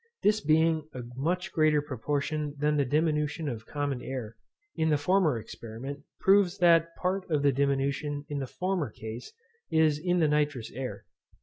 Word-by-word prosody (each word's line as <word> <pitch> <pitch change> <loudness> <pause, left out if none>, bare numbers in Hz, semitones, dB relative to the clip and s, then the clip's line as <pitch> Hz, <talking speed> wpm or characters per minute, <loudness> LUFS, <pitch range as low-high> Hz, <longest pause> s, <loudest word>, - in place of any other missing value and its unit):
This 210 +1 +3
being 155 0 +2
a 125 - -5
much 180 +7 -1
greater 155 -2 +3
proportion 145 +2 -2
than 150 +1 +1
the 145 -2 +2
diminution 150 +2 0
of 115 -4 -5
common 145 -3 -2
air, 120 -3 -5 0.4
in 160 0 +1
the 150 - +3
former 160 -2 +2
experiment, 115 +6 -7 0.2
proves 195 -1 +4
that 165 -1 +4
part 185 +1 -2
of 150 -3 +1
the 140 - +5
diminution 140 +1 0
in 145 -1 -3
the 135 - -3
former 180 -3 -2
case 110 +2 -8 0.4
is 155 -2 +3
in 175 +2 +1
the 160 -3 +4
nitrous 145 -5 0
air. 130 0 -6
150 Hz, 165 wpm, -29 LUFS, 135-165 Hz, 0.4 s, the